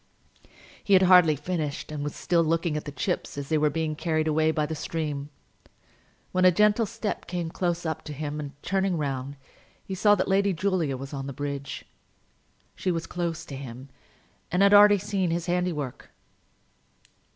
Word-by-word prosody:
He 200 Hz, -, +1 dB
had 190 Hz, 0 st, +7 dB
hardly 180 Hz, -4 st, +6 dB
finished, 150 Hz, -1 st, -4 dB
and 150 Hz, -1 st, -4 dB
was 145 Hz, -, -4 dB
still 170 Hz, -1 st, +2 dB
looking 165 Hz, 0 st, 0 dB
at 150 Hz, -, -3 dB
the 145 Hz, -, -5 dB
chips 175 Hz, +1 st, -3 dB
as 140 Hz, -1 st, -5 dB
they 160 Hz, -, +2 dB
were 150 Hz, 0 st, +3 dB
being 155 Hz, 0 st, -2 dB
carried 155 Hz, -1 st, 0 dB
away 155 Hz, 0 st, +2 dB
by 155 Hz, -1 st, +1 dB
the 160 Hz, -, -4 dB
stream, 150 Hz, -2 st, -4 dB, 1.0 s
when 185 Hz, 0 st, +1 dB
a 185 Hz, -, +8 dB
gentle 210 Hz, +4 st, +3 dB
step 225 Hz, -1 st, -4 dB
came 175 Hz, -2 st, -3 dB
close 175 Hz, -1 st, -2 dB
up 160 Hz, -, -2 dB
to 150 Hz, -, -6 dB
him, 150 Hz, +1 st, -4 dB
and 145 Hz, -2 st, -6 dB
turning 190 Hz, -2 st, 0 dB
round, 140 Hz, -1 st, -3 dB, 0.5 s
he 195 Hz, -, -5 dB
saw 205 Hz, +2 st, +4 dB
that 185 Hz, -, -1 dB
Lady 195 Hz, 0 st, +2 dB
Julia 170 Hz, -6 st, 0 dB
was 135 Hz, +2 st, -8 dB
on 135 Hz, -1 st, -4 dB
the 140 Hz, -, -5 dB
bridge. 140 Hz, 0 st, -5 dB, 0.9 s
She 185 Hz, -, -2 dB
was 165 Hz, -2 st, -1 dB
close 170 Hz, -1 st, -3 dB
to 140 Hz, -, -8 dB
him, 130 Hz, 0 st, -9 dB, 0.6 s
and 180 Hz, +3 st, +3 dB
had 200 Hz, 0 st, +5 dB
already 205 Hz, 0 st, +8 dB
seen 195 Hz, -2 st, -1 dB
his 170 Hz, 0 st, -1 dB
handiwork. 175 Hz, -7 st, -2 dB
165 Hz, 180 wpm, -26 LUFS, 145-185 Hz, 1.0 s, a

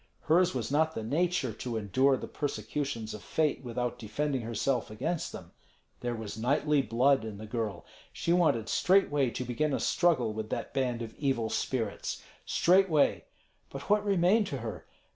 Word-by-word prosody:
Hers 175 Hz, +2 st, +3 dB
was 120 Hz, -1 st, -2 dB
not 160 Hz, +2 st, +2 dB
the 110 Hz, -, -3 dB
nature 155 Hz, 0 st, 0 dB
to 120 Hz, +1 st, -4 dB
endure 130 Hz, +6 st, +2 dB
the -, -, -6 dB
persecutions 115 Hz, -3 st, -3 dB
of 105 Hz, -, -7 dB
fate 155 Hz, -3 st, 0 dB
without 125 Hz, 0 st, -3 dB
defending 135 Hz, +4 st, -2 dB
herself 115 Hz, +2 st, -1 dB
against 155 Hz, +10 st, -3 dB
them. -, -, -10 dB, 0.5 s
There 120 Hz, -1 st, -2 dB
was 110 Hz, -1 st, -6 dB
knightly 140 Hz, +4 st, +2 dB
blood 130 Hz, +3 st, +3 dB
in 110 Hz, -2 st, -6 dB
the 110 Hz, -, -8 dB
girl. 110 Hz, -5 st, -3 dB, 0.3 s
She 170 Hz, -, 0 dB
wanted 155 Hz, -11 st, +2 dB
straightway 145 Hz, -, +3 dB
to 125 Hz, +2 st, -4 dB
begin 140 Hz, +4 st, 0 dB
a -, -, -2 dB
struggle 140 Hz, -11 st, +2 dB
with 110 Hz, 0 st, -5 dB
that -, -, -4 dB
band 125 Hz, -3 st, -1 dB
of 115 Hz, -1 st, -8 dB
evil 130 Hz, -6 st, 0 dB
spirits, 115 Hz, -6 st, -2 dB, 0.2 s
straightway. 180 Hz, -4 st, +3 dB, 0.4 s
But 140 Hz, +8 st, -6 dB
what 210 Hz, 0 st, +4 dB
remained 200 Hz, +1 st, +3 dB
to 140 Hz, -, -3 dB
her? 110 Hz, -6 st, -7 dB
130 Hz, 165 wpm, -30 LUFS, 115-155 Hz, 0.5 s, what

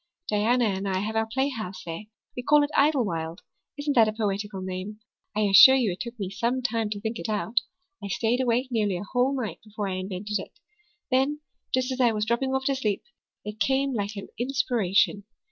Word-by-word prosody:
Diana 230 Hz, +4 st, +2 dB
and 195 Hz, -1 st, -1 dB
I 190 Hz, -, 0 dB
have 215 Hz, +2 st, -3 dB
our 220 Hz, 0 st, +1 dB
playhouse 235 Hz, -7 st, -2 dB
there. 165 Hz, +5 st, -6 dB, 0.3 s
We 250 Hz, -, -3 dB
call 295 Hz, +3 st, +5 dB
it 290 Hz, -, -2 dB
Idlewild. 200 Hz, -, +1 dB, 0.4 s
Isn't 290 Hz, 0 st, -1 dB
that 225 Hz, -3 st, +6 dB
a 215 Hz, -, -1 dB
poetical 205 Hz, -2 st, -2 dB
name? 185 Hz, +3 st, -5 dB, 0.4 s
I 215 Hz, -, +1 dB
assure 205 Hz, +6 st, +9 dB
you 240 Hz, -7 st, +2 dB
it 175 Hz, -, -6 dB
took 235 Hz, -1 st, -6 dB
me 195 Hz, -2 st, -3 dB
some 235 Hz, +5 st, -1 dB
time 230 Hz, -3 st, 0 dB
to 205 Hz, -1 st, -4 dB
think 225 Hz, +2 st, -4 dB
it -, -, -4 dB
out. 220 Hz, +2 st, +1 dB, 0.4 s
I -, -, -3 dB
stayed 230 Hz, +5 st, 0 dB
awake 250 Hz, +1 st, +1 dB
nearly 210 Hz, -5 st, +1 dB
a 175 Hz, -, -5 dB
whole 255 Hz, +5 st, 0 dB
night 225 Hz, -4 st, -4 dB
before 210 Hz, -1 st, -5 dB
I 185 Hz, -, -2 dB
invented 190 Hz, +2 st, -3 dB
it. -, -, -10 dB, 0.5 s
Then, 270 Hz, +4 st, +2 dB, 0.3 s
just 255 Hz, 0 st, +1 dB
as 260 Hz, 0 st, -1 dB
I 240 Hz, -2 st, +4 dB
was 210 Hz, 0 st, -1 dB
dropping 265 Hz, +4 st, 0 dB
off 265 Hz, 0 st, -1 dB
to 275 Hz, -, +2 dB
sleep, 215 Hz, -7 st, -1 dB, 0.4 s
it 210 Hz, +1 st, -6 dB
came 270 Hz, +4 st, +1 dB
like 205 Hz, -2 st, -2 dB
an 200 Hz, -, -7 dB
inspiration. 230 Hz, -6 st, +1 dB
220 Hz, 205 wpm, -26 LUFS, 200-255 Hz, 0.5 s, assure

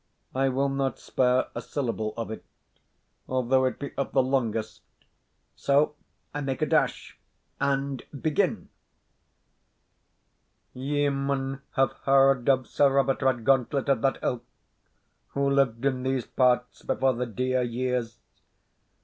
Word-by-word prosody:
I 135 Hz, +1 st, +2 dB
will 135 Hz, +2 st, +1 dB
not 135 Hz, -1 st, -1 dB
spare 125 Hz, 0 st, +1 dB
a -, -, -4 dB
syllable 115 Hz, -6 st, -3 dB
of 115 Hz, -1 st, -4 dB
it, 110 Hz, -, -7 dB, 0.9 s
although 130 Hz, +1 st, +2 dB
it 130 Hz, -, -1 dB
be 140 Hz, -, -6 dB
of 140 Hz, -, -2 dB
the 130 Hz, -, +4 dB
longest; 115 Hz, -5 st, -1 dB, 0.7 s
so 145 Hz, +2 st, +2 dB, 0.4 s
I 145 Hz, -, -3 dB
make 135 Hz, +2 st, -2 dB
a -, -, +4 dB
dash 145 Hz, -, 0 dB, 0.4 s
and 140 Hz, -1 st, 0 dB, 0.2 s
begin: 155 Hz, +1 st, 0 dB, 2.0 s
Ye 145 Hz, +3 st, 0 dB
maun 135 Hz, 0 st, -2 dB
have 135 Hz, 0 st, +3 dB
heard 135 Hz, -1 st, +4 dB
of 130 Hz, -1 st, +3 dB
Sir 140 Hz, -1 st, +3 dB
Robert 135 Hz, -1 st, +2 dB
Redgauntlet 130 Hz, +1 st, +2 dB
of 135 Hz, -5 st, +2 dB
that 135 Hz, +1 st, +1 dB
ilk, 120 Hz, -2 st, -1 dB, 0.9 s
who 140 Hz, 0 st, +1 dB
lived 135 Hz, -3 st, +1 dB
in 130 Hz, -2 st, +1 dB
these 130 Hz, -1 st, -1 dB
parts 125 Hz, -1 st, +1 dB
before 130 Hz, 0 st, +1 dB
the 125 Hz, +1 st, -3 dB
dear 130 Hz, +3 st, 0 dB
years. 120 Hz, -1 st, -2 dB
135 Hz, 130 wpm, -27 LUFS, 125-140 Hz, 2.0 s, the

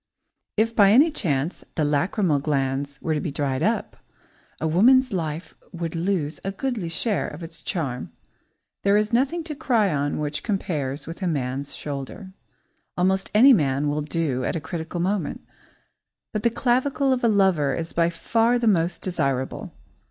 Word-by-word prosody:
If 225 Hz, +2 st, +1 dB
by 200 Hz, -2 st, +6 dB
any 280 Hz, +10 st, +6 dB
chance 155 Hz, -, -1 dB
the 155 Hz, -, +1 dB
lachrymal 150 Hz, +2 st, +1 dB
glands 140 Hz, -1 st, -1 dB
were 160 Hz, -, 0 dB
to 150 Hz, -, -1 dB
be -, -, -2 dB
dried 140 Hz, -2 st, -2 dB
up, -, -, -1 dB, 0.6 s
woman's 230 Hz, +10 st, +4 dB
life 160 Hz, -1 st, -3 dB, 0.2 s
would 170 Hz, -2 st, -4 dB
lose 165 Hz, -3 st, -1 dB
a 195 Hz, -, -2 dB
goodly 215 Hz, -4 st, -3 dB
share 205 Hz, +5 st, -1 dB
of 170 Hz, -, -8 dB
its 165 Hz, 0 st, -8 dB
charm. 135 Hz, -10 st, -3 dB, 0.7 s
There 200 Hz, +1 st, +4 dB
is 210 Hz, +2 st, 0 dB
nothing 280 Hz, +8 st, +1 dB
to 315 Hz, -1 st, -5 dB
cry 220 Hz, -, +2 dB
on 145 Hz, 0 st, -1 dB
which 150 Hz, 0 st, -2 dB
compares 150 Hz, -, -2 dB
with 165 Hz, +5 st, -8 dB
a 185 Hz, -, 0 dB
man's 140 Hz, -2 st, -2 dB
shoulder; 145 Hz, +7 st, -6 dB, 0.6 s
almost 190 Hz, +2 st, +1 dB
any 260 Hz, +5 st, +8 dB
man 145 Hz, -, +1 dB
will 150 Hz, +1 st, -1 dB
do 150 Hz, -4 st, -1 dB
at -, -, -1 dB
a -, -, -1 dB
critical 165 Hz, +3 st, -5 dB
moment; 190 Hz, +3 st, -2 dB, 0.9 s
but 215 Hz, -, -1 dB
the 235 Hz, -, +3 dB
clavicle 260 Hz, +3 st, +1 dB
of 250 Hz, -, -2 dB
a -, -, +5 dB
lover 190 Hz, -, +3 dB
is 165 Hz, +2 st, -5 dB
by 170 Hz, 0 st, +2 dB
far 230 Hz, +7 st, +1 dB
the 240 Hz, -, -1 dB
most 175 Hz, -5 st, +1 dB
desirable. 140 Hz, -8 st, -2 dB
170 Hz, 165 wpm, -24 LUFS, 145-210 Hz, 0.9 s, any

